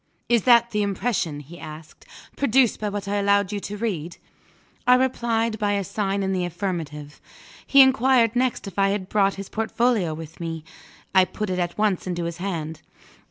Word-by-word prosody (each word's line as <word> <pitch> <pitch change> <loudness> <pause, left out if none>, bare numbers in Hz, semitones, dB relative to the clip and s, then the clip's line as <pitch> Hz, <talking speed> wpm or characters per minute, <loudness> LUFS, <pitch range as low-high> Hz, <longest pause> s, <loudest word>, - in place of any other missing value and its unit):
"Is 235 -3 +2
that 235 -1 +5
the 210 -1 0
impression," 195 -7 -1
he 165 +5 -13
asked, 155 0 -11 0.3
"produced 260 -3 +2
by 210 - -2
what 200 0 -5
I 205 +1 -1
allowed 200 -1 +2
you 205 - -2
to 205 +1 -6
read?" 180 -7 -3 0.7
I 250 - +7
replied 230 -3 0
by 205 -1 +1
a 200 -1 0
sign 200 +1 -2
in 190 - -1
the 185 -1 0
affirmative. 165 -5 -5 0.5
He 275 - +7
inquired 260 -3 +3
next 250 -1 0
if 195 -1 -6
I 195 0 +4
had 195 -1 -3
brought 200 -2 +2
his 195 -1 -7
portfolio 225 -6 0
with 160 0 -10
me. 165 -2 -5 0.5
I 190 -1 +6
put 185 +2 -4
it 185 - -1
at 175 -1 -2
once 210 -4 0
into 175 -1 -2
his 170 0 -4
hand. 165 -4 -4
200 Hz, 185 wpm, -24 LUFS, 175-225 Hz, 0.7 s, I